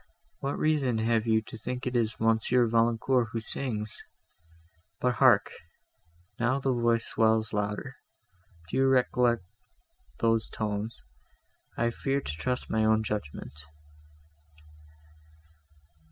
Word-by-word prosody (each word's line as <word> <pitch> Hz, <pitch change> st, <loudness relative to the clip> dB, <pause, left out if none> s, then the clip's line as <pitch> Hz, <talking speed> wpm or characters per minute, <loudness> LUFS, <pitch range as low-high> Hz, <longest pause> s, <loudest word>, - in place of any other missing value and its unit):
What 140 Hz, +1 st, -2 dB
reason 145 Hz, -6 st, +1 dB
have 115 Hz, 0 st, +1 dB
you 110 Hz, -1 st, +3 dB
to 115 Hz, -, -10 dB
think 125 Hz, +3 st, -4 dB
it 125 Hz, -1 st, -2 dB
is 115 Hz, -2 st, 0 dB
Monsieur 115 Hz, +2 st, +3 dB
Valancourt, 115 Hz, +2 st, +2 dB
who 115 Hz, -, -1 dB
sings? 110 Hz, -2 st, -4 dB, 1.0 s
But 125 Hz, 0 st, +1 dB
hark! 120 Hz, -7 st, +5 dB, 0.9 s
now 120 Hz, +3 st, +2 dB
the 135 Hz, -1 st, 0 dB
voice 120 Hz, -1 st, +1 dB
swells 110 Hz, 0 st, +1 dB
louder! 105 Hz, 0 st, -3 dB, 0.7 s
Do -, -, -3 dB
you 135 Hz, 0 st, +4 dB
recollect 125 Hz, -4 st, +2 dB, 0.7 s
those 115 Hz, -1 st, +1 dB
tones? 105 Hz, +1 st, -3 dB, 0.8 s
I 120 Hz, 0 st, +1 dB
fear 135 Hz, +3 st, -1 dB
to 105 Hz, -, -5 dB
trust 125 Hz, +10 st, -3 dB
my 110 Hz, 0 st, +1 dB
own 110 Hz, 0 st, +3 dB
judgment." 105 Hz, -12 st, -5 dB
115 Hz, 115 wpm, -28 LUFS, 110-125 Hz, 1.0 s, hark